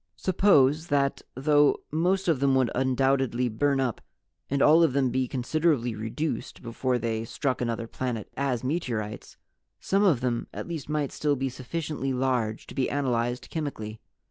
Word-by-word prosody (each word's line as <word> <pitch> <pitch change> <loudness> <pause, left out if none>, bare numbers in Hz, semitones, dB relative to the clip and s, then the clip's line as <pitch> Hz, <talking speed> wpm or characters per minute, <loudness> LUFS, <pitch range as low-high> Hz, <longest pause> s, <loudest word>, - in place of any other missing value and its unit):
Suppose 160 -5 +3
that, 140 -2 +1
though 145 +2 +4
most 180 +5 +1
of 160 -6 +2
them 135 -1 +3
would 130 -3 +2
undoubtedly 130 -1 +1
burn 140 +5 +1
up 125 -4 -1 0.5
and 140 - 0
all 155 +4 +6
of 160 -6 +3
them 135 -2 +2
be 130 +1 0
considerably 130 -1 0
reduced 110 +11 -4
before 125 +2 -1
they 115 -1 -2
struck 130 +3 -2
another 115 -1 -2
planet 115 -2 -4
as 130 -3 -1
meteorites, 120 -8 -3 0.4
some 195 +1 +1
of 160 -12 +3
them 120 -2 -1
at - - -5
least 165 -4 -5
might 150 -2 -1
still 150 -1 0
be 135 0 -2
sufficiently 135 +1 -4
large 125 -4 -1
to - - -11
be 130 - 0
analyzed 125 -3 -1
chemically? 115 -9 -5
130 Hz, 160 wpm, -27 LUFS, 120-150 Hz, 0.5 s, all